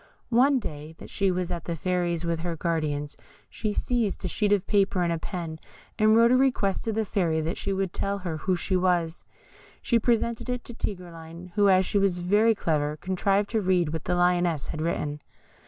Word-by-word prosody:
One 260 +4 +4
day 155 - -6
that - - -12
she 195 -1 +1
was 180 -1 -1
at 170 -2 -4
the 170 - -2
Fairy's 175 0 -1
with 170 -1 -1
her 170 0 -3
guardians, 155 -3 -2 0.4
she 215 - -2
seized 220 -3 -1
a - - +1
sheet 205 +3 0
of 205 -2 +2
paper 195 -3 +2
and 170 -1 +1
a 165 - -3
pen, 165 -3 -5 0.4
and 215 0 +5
wrote 230 +1 +6
a - - +6
request 255 -7 +1
to 225 - 0
the 220 0 -1
Fairy 170 -5 0
that 160 +3 -2
she - - -2
would 190 -2 -1
tell 200 0 -1
her 175 -5 -4
who 185 +4 0
she 185 +2 -1
was. 180 -2 +1 0.6
She 235 - +2
presented 235 +1 0
it 250 0 -2
to 240 - -9
Tigreline, 175 -4 -7
who, 205 -1 +4
as 185 0 +4
she 205 - +1
was 195 -3 +2
very 205 +6 +3
clever, 150 -5 -1
contrived 195 +3 0
to 220 -2 +1
read 180 -5 +1
what 160 - -4
the 180 - 0
Lioness 175 -4 +1
had 155 - -4
written. 150 -2 -2
180 Hz, 205 wpm, -26 LUFS, 165-205 Hz, 0.6 s, wrote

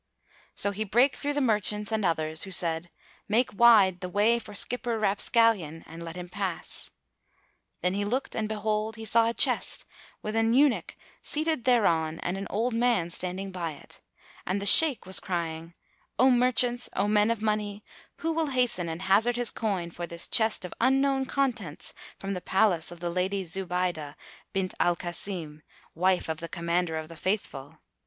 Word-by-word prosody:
So 200 - 0
he 205 +2 -3
brake 240 +7 +3
through 290 0 -2
the 290 - 0
merchants 210 -3 0
and 220 -1 0
others, 160 -2 +1
who 190 - -3
said, 170 -1 0 0.4
"Make 225 +2 +1
wide 205 -5 +6
the 180 - -5
way 215 +5 +3
for 210 -3 -10
Skipper 240 +1 0
Rapscallion, 205 -5 +2
[FN#244] - - -19
and 165 +1 -10
let 165 0 -7
him 180 0 -7
pass." 185 -1 -5 0.9
Then 180 +1 +1
he 200 +1 -1
looked 245 +7 -2
and 215 -1 -2
behold, 215 0 -2
he 225 0 -8
saw 230 +1 +4
a - - -2
chest, - - +1 0.4
with 215 +1 -4
an 225 +1 +2
eunuch 280 -1 +2 0.3
seated 310 -4 -2
thereon 165 -10 +2
and 175 - -2
an 195 0 -5
old 230 +4 -1
man 230 -7 +1
standing 185 +2 -4
by 170 -4 -4
it, 140 - -16 0.4
and 190 +2 -1
the 200 - -5
Shaykh 280 +4 +6
was 190 0 0
crying, 165 -1 -4 0.4
"O 260 +2 +5
merchants, 245 0 +1
O 200 - +1
men 210 +1 +3
of 230 -2 0
money, 210 -1 -2 0.3
who 330 - -2
will 320 -1 0
hasten 245 -10 0
and 165 +3 -5
hazard 215 +6 +3
his 245 -1 +2
coin 190 -6 -2
for 175 +1 -6
this 170 0 +2
chest 220 -4 +3
of 180 - -7
unknown 270 +1 +2
contents 240 - -2 0.2
from 195 0 -4
the 180 - -4
Palace 190 -3 +2
of 175 -1 -11
the 175 -1 -2
Lady 190 +2 -1
Zubaydah 180 -4 -2 0.4
bint 190 -2 -2
al 175 - +3
Kasim, 170 -3 -4 0.3
wife 185 +2 +1
of 160 -1 -3
the 170 +1 -7
Commander 170 -1 -1
of 160 0 -5
the 165 - -11
Faithful? 160 -6 -4
200 Hz, 180 wpm, -27 LUFS, 175-230 Hz, 0.9 s, wide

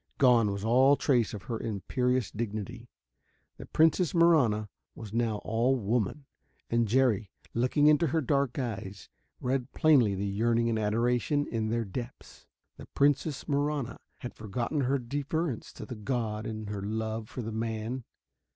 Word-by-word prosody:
Gone 120 -5 +5
was 100 0 -4
all 130 +5 +5
trace 125 -6 +2
of 100 -3 -7
her 115 +4 -4
imperious 125 +3 -1
dignity. 115 +2 -5 0.7
The - - -10
Princess 165 +2 +3
Marahna 140 -11 +4 0.3
was 110 -3 -9
now 115 -2 +1
all 115 +4 +2
woman. 120 +4 -1 0.5
And 115 -1 +2
Jerry, 115 -4 +2 0.2
looking 125 +5 +2
into 150 +2 +5
her 160 +3 +1
dark 140 -3 0
eyes, 100 -7 -5 0.3
read 130 0 -1
plainly 135 -11 +4
the 100 +2 -2
yearning 115 +4 +1
and 110 -1 0
adoration 120 +7 +1
in 110 -4 -2
their 115 0 0
depths. 120 +6 -8 0.3
The - - -11
Princess 145 +1 +1
Marahna 145 -3 -1 0.2
had 125 - -6
forgotten 115 +7 -3
her 135 +2 +1
deference 140 +2 -3
to - - -8
the - - -7
god 110 -1 -3
in 110 -1 -5
her 105 -1 -4
love 110 +1 -3
for 125 - -5
the 110 - -4
man. 115 +3 -3
120 Hz, 150 wpm, -29 LUFS, 110-135 Hz, 0.7 s, Gone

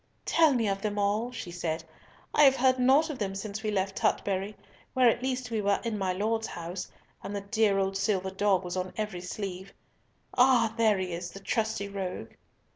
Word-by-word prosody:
"Tell 320 -5 +4
me 230 -3 +1
of 195 0 -1
them 210 0 -2
all," 205 +4 0
she 225 -7 -7
said. 170 -2 -3 0.5
"I - - +4
have 270 -2 +7
heard 255 0 +3
naught 275 +6 +4
of 275 - -7
them 195 -2 -2
since 205 +1 -5
we 215 - -2
left 195 -1 -1
Tutbury, 195 +1 0 0.4
where 255 -1 +5
at 235 +1 +3
least 255 -1 -2
we 220 -2 0
were 200 0 +2
in 230 -2 -2
my 190 -3 0
Lord's 220 +4 -1
house, 175 +2 -6 0.3
and 200 +1 -5
the 200 - -2
dear 205 0 +2
old 195 0 0
silver 195 -1 0
dog 195 -1 +2
was 175 0 -4
on 185 0 -3
every 210 -5 -3
sleeve. 190 0 -6 0.6
Ah! 245 -3 +4
there 220 -3 +3
he 185 -2 -3
is, 175 +1 -4
the 195 - -10
trusty 220 0 -1
rogue." 195 -2 -5
205 Hz, 200 wpm, -29 LUFS, 190-230 Hz, 0.6 s, have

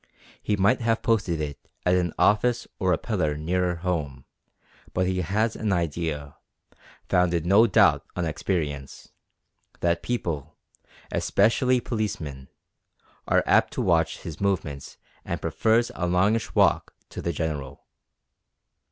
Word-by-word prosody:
He 105 - 0
might 100 +7 +3
have 115 -1 0
posted 100 -8 +1
it 75 -2 -4 0.3
at 90 - +4
an 90 -2 +1
office 120 +4 +2
or 95 -1 +2
a 85 - +3
pillar 80 -10 -1
nearer 90 +3 0
home, 80 -7 -3 0.7
but 90 - +2
he 95 0 0
has 105 +6 0
an 110 -2 -1
idea, 80 -4 -2 0.7
founded 85 -2 +2
no 100 +6 +6
doubt 100 - +4
on 90 - -1
experience, 75 -4 -3 0.7
that 85 0 +1
people, 80 - -3 0.5
especially 125 +5 +2
policemen, 85 - -4 0.8
are - - +3
apt - - +3
to - - -2
watch - - +1
his 80 +1 -8
movements 80 -8 -2 0.3
and - - -3
prefers 115 +1 +1
a 90 - -2
longish 100 +6 +1
walk - - +2
to - - -7
the 85 - -1
General. 75 -4 -4
90 Hz, 130 wpm, -25 LUFS, 80-105 Hz, 0.8 s, no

